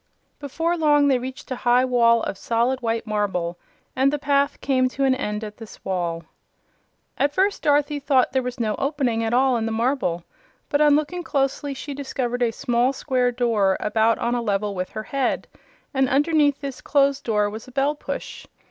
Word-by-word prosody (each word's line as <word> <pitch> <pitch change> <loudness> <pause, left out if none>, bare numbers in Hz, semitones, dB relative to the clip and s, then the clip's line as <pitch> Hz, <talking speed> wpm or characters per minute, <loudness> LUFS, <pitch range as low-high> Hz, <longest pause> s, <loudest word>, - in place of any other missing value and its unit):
Before 325 +4 -1
long 295 -3 +3
they 260 -2 +3
reached 260 +1 -8
a - - 0
high 245 +1 +3
wall 235 -2 +3
of - - -3
solid 235 +5 0
white 230 -1 -1
marble, 190 -5 -2 0.4
and 265 +1 +3
the 295 - -1
path 280 0 +1
came 255 -2 +1
to 275 +2 -3
an 265 -1 +4
end 210 -5 -3
at 210 -1 -8
this 225 -4 -12
wall. 175 -3 -2 1.0
At 285 +1 +1
first 395 +2 +1
Dorothy 290 0 +2
thought 270 -3 +2
there 265 - +1
was 250 0 -5
no 220 -2 0
opening 270 -5 0
at 225 - -1
all 255 0 +3
in 225 -1 -2
the - - -2
marble, 225 -7 0 0.5
but 290 - +1
on 295 -1 +6
looking 305 +4 -1
closely 275 -2 -1
she 285 +2 -6
discovered 255 -3 -3
a 240 - +3
small 240 +3 +1
square 255 -2 0
door 225 -6 +1
about 220 +1 +2
on 235 - -1
a 245 - 0
level 205 -2 -1
with 185 -1 -4
her 215 - -6
head, 270 +2 -1 0.5
and 265 -1 +2
underneath 290 0 +2
this 275 -2 -6
closed 280 -1 +2
door 210 -2 +1
was 220 +4 -7
a - - -12
bell 275 +3 +1
push. 300 - -7
255 Hz, 195 wpm, -23 LUFS, 225-280 Hz, 1.0 s, on